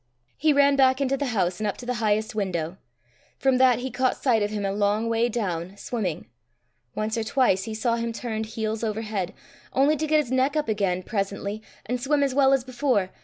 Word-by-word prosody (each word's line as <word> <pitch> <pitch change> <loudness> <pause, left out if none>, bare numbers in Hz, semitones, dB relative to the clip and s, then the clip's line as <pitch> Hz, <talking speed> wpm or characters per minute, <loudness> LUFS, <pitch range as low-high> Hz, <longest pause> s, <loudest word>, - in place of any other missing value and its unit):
He 310 +1 +2
ran 280 -1 +4
back 260 -1 +4
into 275 -1 +1
the 280 +1 -2
house, 185 -6 0
and 215 - -1
up 205 - -2
to 245 - -9
the 250 - -1
highest 215 +2 +1
window. 180 -4 -2 0.6
From 265 -2 +2
that 255 -2 +5
he 255 +2 -4
caught 255 +1 +1
sight 235 -5 +2
of 205 - +1
him 210 -1 -3
a 195 - 0
long 205 +2 +1
way 230 +1 +2
down, 190 -5 -3
swimming. 200 -8 -3 0.7
Once 215 +1 -1
or - - -1
twice 220 -5 +2
he 220 - -5
saw 230 +1 0
him 230 0 -2
turned 220 -1 -4
heels 220 0 -3
over 220 0 -1
head 205 -5 -3 0.4
only 280 +3 +4
to 310 +1 -2
get 310 0 +4
his 270 -5 -2
neck 260 +3 +2
up 305 -1 0
again 195 -4 0
presently, 200 0 -3 0.2
and 245 +3 -2
swim 285 +2 +2
as 275 -2 0
well 270 0 +4
as 270 -2 +3
before. 250 -7 0
225 Hz, 220 wpm, -25 LUFS, 205-260 Hz, 0.7 s, that